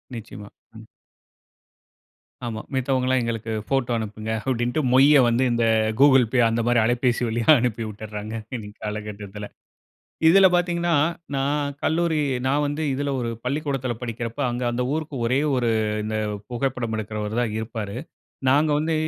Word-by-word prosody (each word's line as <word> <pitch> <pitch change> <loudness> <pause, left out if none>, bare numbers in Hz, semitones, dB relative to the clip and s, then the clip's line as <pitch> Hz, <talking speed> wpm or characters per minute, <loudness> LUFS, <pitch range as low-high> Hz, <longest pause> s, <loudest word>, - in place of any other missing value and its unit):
நிச்சயமா. 105 -2 -9 0.3
ம். 110 - -14 1.6
ஆமா. 110 -2 -4
மித்தவங்கலாம் 130 -1 +1
எங்களுக்கு 115 -1 -3 0.2
போட்டோ 135 -3 0
அனுப்புங்க 110 0 -5 0.2
அப்டின்ட்டு 120 +4 0
மொய்ய 140 +2 +7
வந்து 120 +2 +2
இந்த 120 -1 +1 0.3
Google 135 -3 +6
Pay 130 - +3
அந்த 115 +1 0
மாரி 120 -1 +4
அலபேசி 120 +1 +1
வழியா 115 0 -2
அனுப்பி 115 -1 -1
விட்டுறாங்க. 105 0 -7 0.2
இந்த 110 -4 -6
காலகட்டத்தில. 105 -1 -6 0.8
இதில 195 +3 +7
பார்த்தீங்கனா 175 -1 +1 0.4
நான் 140 +1 0
கல்லூரி 165 0 +1 0.3
நான் 145 +2 +2
வந்து 145 +2 -3
இதில 140 +1 -2
ஒரு 115 - -2
பள்ளிக்கூடத்தில 135 -2 -2
படிக்கிறப்ப, 115 +1 -5
அங்க 120 +1 -4
அந்த 120 +1 -1
ஊருக்கு 155 -1 -4
ஒரே 130 +4 +2
ஒரு 125 -2 +1 0.4
இந்த 110 0 -2 0.3
புகைப்படம் 120 -2 -2
எடுக்குறவரு 105 +1 -4
தான் 115 -3 -1
இருப்பாரு. 110 -2 -5 0.5
நாங்க 150 +3 +4
வந்து 160 +2 0
120 Hz, 135 wpm, -23 LUFS, 110-140 Hz, 1.6 s, மொய்ய